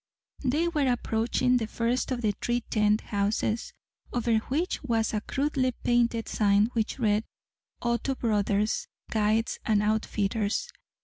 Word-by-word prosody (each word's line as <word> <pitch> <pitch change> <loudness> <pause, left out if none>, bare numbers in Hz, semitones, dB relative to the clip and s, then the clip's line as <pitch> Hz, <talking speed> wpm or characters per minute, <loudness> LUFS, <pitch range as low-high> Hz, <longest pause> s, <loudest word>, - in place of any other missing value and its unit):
They 295 +6 +1
were 295 -6 +1
approaching 245 +2 +1
the 225 -3 -2
first 235 +3 -1
of 245 -2 -2
the 215 - +3
three 240 0 0
tent 210 -1 +2
houses, 210 +2 -1 0.4
over 235 -1 +1
which 300 +10 -2
was 230 -5 0
a 210 - 0
crudely 270 0 0
painted 235 -1 +2
sign 205 +2 +3
which 225 -2 -1
read 215 -3 +2 0.6
"Otto 235 +3 0
Brothers, 210 -2 0 0.2
Guides 220 +1 +1
and 210 -1 +2
Outfitters." 215 - 0
225 Hz, 130 wpm, -28 LUFS, 215-250 Hz, 0.6 s, the